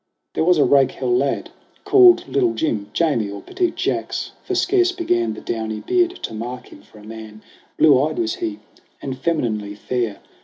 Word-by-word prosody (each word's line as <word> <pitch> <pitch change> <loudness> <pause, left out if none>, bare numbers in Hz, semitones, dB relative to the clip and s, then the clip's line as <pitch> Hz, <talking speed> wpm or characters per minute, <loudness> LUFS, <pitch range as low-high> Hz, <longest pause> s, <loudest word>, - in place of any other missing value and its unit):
There - - 0
was 180 +1 +4
a 145 - +4
rakehell 130 -2 +2
lad, 135 +2 -1 0.3
called 370 -3 +6
Little 365 -4 +1
Jim, 105 -10 -2
Jamie 120 -8 0
or 100 0 -7
Petit 360 - -1
Jacques; - - -2
for 375 - -3
scarce 360 0 +2
began 120 - -1
The - - -9
downy 110 -1 -3
beard 360 0 +1
to - - -4
mark 120 +3 -6
him - - -14
for - - -20
a 105 - -14
man. 110 0 -10 0.3
Blue 140 -4 +6
eyed 155 +2 -1
was 340 -1 0
he 325 -3 -3 0.4
and 135 -1 -5
femininely 115 -9 -2
fair. 115 0 -3
130 Hz, 180 wpm, -21 LUFS, -, 0.4 s, called